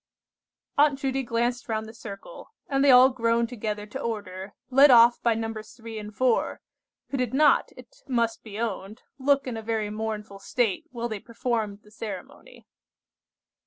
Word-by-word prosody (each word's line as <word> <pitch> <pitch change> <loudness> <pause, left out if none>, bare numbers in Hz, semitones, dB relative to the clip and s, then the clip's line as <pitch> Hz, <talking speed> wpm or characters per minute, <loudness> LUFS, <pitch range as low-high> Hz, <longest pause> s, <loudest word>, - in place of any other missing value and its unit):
Aunt 290 -1 +5
Judy 270 0 -1
glanced 240 0 -1
round 220 0 -1
the 220 - -10
circle, 225 - -10
and 275 -1 +1
they 285 - +5
all 255 0 +8
groaned 230 -1 +1
together 210 -3 -4
to 210 - -7
order, 200 -3 -5 0.2
led 275 +3 +7
off 240 -1 +7
by 235 -2 +2
Nos. 225 -1 -5
3 230 -2 -8
and 210 0 -9
4, 255 -2 +1 0.5
who 275 - -1
did 250 -1 -1
not, 295 0 +4
it 255 0 -15
must 235 -3 0
be 215 -1 -8
owned, 215 -1 -4 0.2
look 275 +1 +2
in 245 -3 -4
a - - -5
very 220 -2 -2
mournful 215 -2 -5
state 225 -1 -1
while 240 -2 -4
they 215 -3 -5
performed 220 -3 -3
the 210 - -19
ceremony. 215 - -9
230 Hz, 165 wpm, -26 LUFS, 215-250 Hz, 0.5 s, all